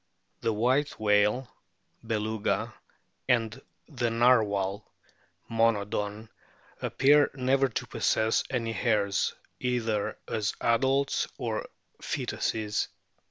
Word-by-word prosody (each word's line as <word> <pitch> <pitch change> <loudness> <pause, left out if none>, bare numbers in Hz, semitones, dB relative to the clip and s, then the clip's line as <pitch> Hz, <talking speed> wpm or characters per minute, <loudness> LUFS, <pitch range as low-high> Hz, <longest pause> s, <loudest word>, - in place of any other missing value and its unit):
The 115 - +1
White 130 +7 +1
whale, 105 +4 +3 0.6
Beluga, 110 -1 -1 0.6
and 115 +1 +1 0.3
the 120 -6 -1
Narwhal, 110 -4 +2 0.6
Monodon, 105 -1 0 0.5
appear 145 +2 +4
never 135 +1 +2
to 115 - -3
possess 110 0 +1
any 115 -3 -1
hairs, 105 -2 +1 0.2
either 115 -4 -1
as 110 -1 -1
adults 135 +4 +2
or - - -3 0.3
foetuses. 105 -2 -1
115 Hz, 85 wpm, -28 LUFS, 105-125 Hz, 0.6 s, appear